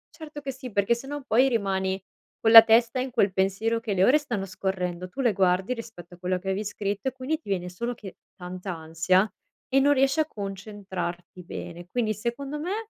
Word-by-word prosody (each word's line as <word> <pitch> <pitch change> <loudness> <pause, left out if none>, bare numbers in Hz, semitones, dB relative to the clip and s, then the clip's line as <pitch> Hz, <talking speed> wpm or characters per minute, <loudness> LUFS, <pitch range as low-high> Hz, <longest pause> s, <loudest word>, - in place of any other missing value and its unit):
Certo 305 -2 -9
che 275 -1 -4
sì, 255 -2 -9
perché 200 +4 +2
sennò 275 +4 -6
poi 255 +3 +4
rimani 190 -5 -1 0.4
con 225 - +3
la 225 0 +14
testa 230 +2 +3
in 255 0 -3
quel 205 -5 +2
pensiero, 195 +5 0
che 225 -3 -3
le 185 - +2
ore 260 +9 +6
stanno 235 -10 -3
scorrendo, 185 -1 -3
tu 270 - -5
le 235 -5 +3
guardi 190 +4 +2
rispetto 180 -7 -10
a - - -21
quello 180 0 -1
che 190 - -11
avevi 195 +2 -1
scritto, 205 +5 -2
e - - -12
quindi 265 +4 -3
ti 315 - -23
viene 180 -2 -1
solo 235 +7 -4
che 200 -5 -11 0.2
tanta 180 +1 -6
ansia, 165 +5 +1 0.4
e 270 - +3
non 285 +2 +4
riesci 270 +3 +2
a 310 - +4
concentrarti 190 - -6
bene. 175 0 -8
Quindi, 225 0 0
secondo 260 +7 -4
me, 415 +7 -4
210 Hz, 205 wpm, -26 LUFS, 185-255 Hz, 0.4 s, la